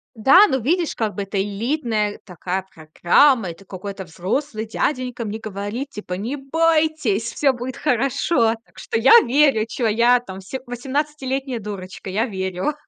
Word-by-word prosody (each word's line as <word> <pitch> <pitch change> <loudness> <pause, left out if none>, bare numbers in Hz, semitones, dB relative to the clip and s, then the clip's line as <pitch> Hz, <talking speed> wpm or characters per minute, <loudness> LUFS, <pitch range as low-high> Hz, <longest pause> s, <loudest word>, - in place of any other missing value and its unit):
Да, 315 - +7
ну, 265 - 0
видишь, 330 +7 0
как 220 -3 -2
бы 200 - -2
это 195 0 -2
элитная 215 0 -2
такая 185 0 -4
программа. 175 - +3
Это 180 +4 -15
какой-то 195 +1 -7
взрослый 215 - -3
дяденька 250 +1 -2
мне 215 +1 -4
говорит, 215 +5 -5
типа: 210 -3 -7
"Не 220 +10 -3
бойтесь, 305 -6 +1
всё 275 -3 +2
будет 245 +1 -6
хорошо". 250 -3 +1
Так - - -29
что - - -2
я 250 - +6
верю, 270 -3 +3
чего 235 -1 -1
я 235 +3 +4
там 195 -5 -9
се 260 +8 -6
восемнадцатилетняя 265 0 -3
дурочка, 195 -2 -7
я 210 +5 0
верю. 190 +3 -2
230 Hz, 155 wpm, -21 LUFS, 200-270 Hz, -, Да